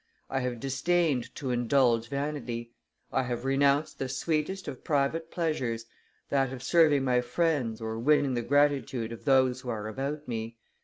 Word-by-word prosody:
I 135 - +1
have 125 -2 -3
disdained 140 +1 0
to 135 -6 -3
indulge 120 -1 +2
vanity. 130 -5 -4 0.4
I - - +2
have 120 -1 -3
renounced 140 +2 +2
the 135 - -2
sweetest 155 +7 -1
of 135 -3 -7
private 155 +3 0
pleasures, 130 -10 -2 0.4
that 135 -2 +1
of 130 -1 -7
serving 150 -2 +4
my 125 -2 +2
friends 125 -3 0
or 110 0 -4
winning 145 +1 +3
the 120 - 0
gratitude 135 -3 +1
of 115 - -9
those 130 -2 +3
who 125 - -7
are 110 -2 -3
about 140 +7 -4
me. 115 -1 -4
135 Hz, 160 wpm, -29 LUFS, 120-145 Hz, 0.4 s, serving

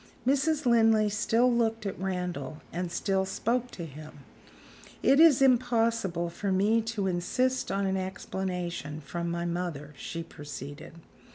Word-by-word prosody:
Mrs. 285 +3 +2
Linley 225 -3 +4
still 235 +4 +2
looked 225 -2 0
at 195 - -4
Randal, 180 -6 -4
and 175 0 -3
still 190 +1 0
spoke 240 +5 -1
to 170 - -7
him. 150 -1 -11 0.8
"It 275 +2 +5
is 310 -5 +7
impossible 230 -9 +2
for 195 +3 -3
me 210 +4 +3
to 225 -3 -3
insist 250 +9 0
on 195 0 0
an 190 0 0
explanation 180 -4 -4
from 170 +3 -4
my 170 0 -2
mother," 170 -4 -3
she 165 +4 -5
proceeded. 145 -2 -9
190 Hz, 135 wpm, -29 LUFS, 170-230 Hz, 0.8 s, is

